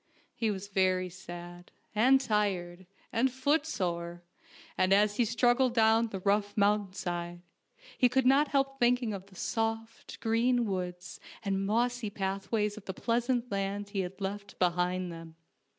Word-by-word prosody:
He 230 -3 -1
was 200 -1 -4
very 185 -2 +1
sad, 175 0 -10 0.2
and 255 +5 +5
tired, 190 -6 -1 0.3
and 255 +3 +2
footsore, 185 - -1 0.5
and 185 +1 +3
as 205 +1 +3
he 240 - +3
struggled 245 +2 +2
down 225 0 +4
the 195 -4 -6
rough 205 +1 +1
mountain 205 -1 +2
side, 175 -2 -4 0.6
he 250 - +5
could 265 +1 +2
not 275 +3 +5
help 275 -1 0
thinking 245 -2 +2
of 195 -1 -7
the 195 - -18
soft, 225 +2 -3
green 235 +2 +2
woods 180 -3 -4 0.3
and 195 0 0
mossy 240 +1 0
pathways 200 +2 -2
of 215 - -11
the 190 - -5
pleasant 240 0 0
laud 200 +1 -2
he 200 - -3
had 190 +1 -4
left 200 0 -5
behind 180 0 0
him. 165 -1 -10
205 Hz, 150 wpm, -30 LUFS, 185-235 Hz, 0.6 s, and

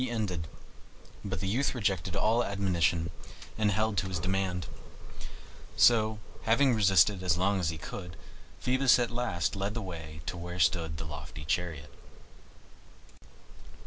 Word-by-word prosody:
He 130 - -1
ended; 95 -9 -2 0.8
but 95 -3 -4
the 95 - -2
youth 130 +8 0
rejected 95 -5 -1
all 115 +3 +2
admonition 90 -4 0 0.4
and 110 -1 +2
held 110 +1 0
to 95 - -2
his 95 -1 -2
demand. 90 0 -1 1.1
So, 110 -2 +5 0.2
having 125 +4 +3
resisted 95 -2 +4
as 90 -2 +2
long 95 +2 +2
as 85 -4 0
he 80 - -4
could, 85 +2 -8 0.4
Phoebus 130 +1 +4
at 120 -1 0
last 115 -8 -1
led 100 +2 -2
the 115 - -2
way 80 -4 -7
to 90 - -4
where 90 +1 -6
stood 80 -2 +1
the 80 - -5
lofty 75 0 -8
chariot. 75 -3 -2
95 Hz, 145 wpm, -30 LUFS, 85-110 Hz, 1.1 s, So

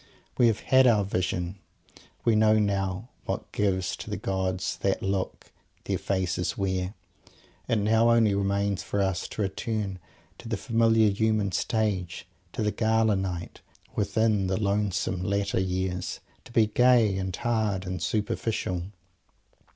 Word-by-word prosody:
We 120 - +5
have 110 -2 +1
had 130 -1 +5
our 110 -4 +4
Vision. 90 -1 -2 0.7
We 115 - +4
know 110 0 +5
now 100 +1 -1 0.2
what - - -4
gives 95 -3 0
to - - -8
the - - -2
gods 95 -1 -2
"that 95 -1 -1
look" 95 -1 -3 0.3
their - - -2
faces 90 -2 -1
wear. 95 0 -1 0.7
It - - +2
now 110 +2 +3
only 115 -3 +4
remains 100 0 0
for 100 - -3
us 95 -3 0
to 105 - -3
return 100 -1 -3 0.4
to - - -9
the 115 - -1
familiar 115 -2 +3
human 110 -1 +1
Stage; 95 -2 -1 0.3
to - - -2
the 105 - +1
"Gala 110 -1 +2
Night, 90 -3 -4 0.3
within 105 -1 +1
the 95 0 0
lonesome 100 -3 0
latter 100 +1 0
years," 95 -1 -2 0.3
and - - -16
be 115 -2 +4
gay, 115 -2 +4
and 95 -2 -3
"hard," 110 -5 -1
and 90 -2 -4
"superficial"! 105 -4 -1
100 Hz, 145 wpm, -27 LUFS, 95-110 Hz, 0.7 s, We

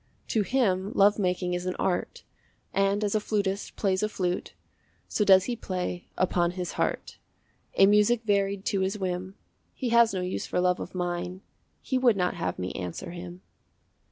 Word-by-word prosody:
To 220 - +2
him 200 -4 +1
love 205 +2 +5
making 180 -1 0
is 180 +1 -3
an 185 - -1
art, 180 - -2 0.5
And 195 +1 +2
as 205 - 0
a 215 - +3
flutist 200 -2 -2
plays 190 -2 0
a 215 - 0
flute, 180 -3 -3 0.5
So 210 - 0
does 190 -2 +7
he 245 - -2
play 180 -4 -4
upon 175 -1 +1
his 180 -2 -3
heart - - -2 0.6
A 195 - +7
music 210 +3 +4
varied 200 -2 0
to 195 - 0
his 190 +2 0
whim. 185 0 -3 0.4
He 255 - -2
has 235 -1 +5
no 190 -2 -2
use 180 +1 -3
for - - -1
love 180 0 +2
of - - -7
mine, 180 +1 -3 0.4
He 260 - 0
would 240 -5 +4
not 180 -1 +1
have 90 -1 -3
me 90 0 -3
answer 90 - -6
him. 175 +1 -9
190 Hz, 180 wpm, -27 LUFS, 180-210 Hz, 0.6 s, does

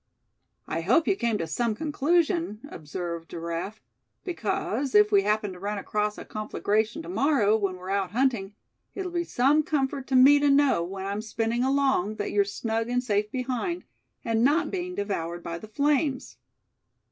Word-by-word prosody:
"I 165 - -2
hope 250 - +3
you - - +3
came 235 - 0
to 165 - -2
some 225 +7 -1
conclusion," 315 - 0
observed 170 +1 -6
Giraffe; 170 +5 -5 0.4
"because, 265 - -2
if 210 0 +6
we 200 -1 +5
happen 210 -1 0
to 180 - -11
run 205 +2 -3
across 210 +1 -2
a - - -8
conflagration 215 +5 -1
to - - -10
morrow, 275 - +2
when 200 -4 -1
we're 185 +1 -7
out 195 -2 0
hunting, 225 -4 0 0.4
it'll 375 -2 -4
be 345 0 -1
some 285 0 +3
comfort 275 -3 -1
to 265 - 0
me 275 +3 +7
to 290 0 +3
know, 275 -10 +4
when 190 +2 -6
I'm 200 +2 -2
spinning 225 +2 -1
along, 265 -7 +1
that 205 - -3
you're 205 -1 +3
snug 225 +3 -2
and 250 0 0
safe 210 -3 0
behind, 260 +7 -2 0.4
and 225 -1 +1
not 300 +6 +2
being 360 -1 -3
devoured 175 -4 -3
by 170 0 -5
the 215 - -10
flames." 280 +3 0
225 Hz, 170 wpm, -26 LUFS, 200-280 Hz, 0.4 s, me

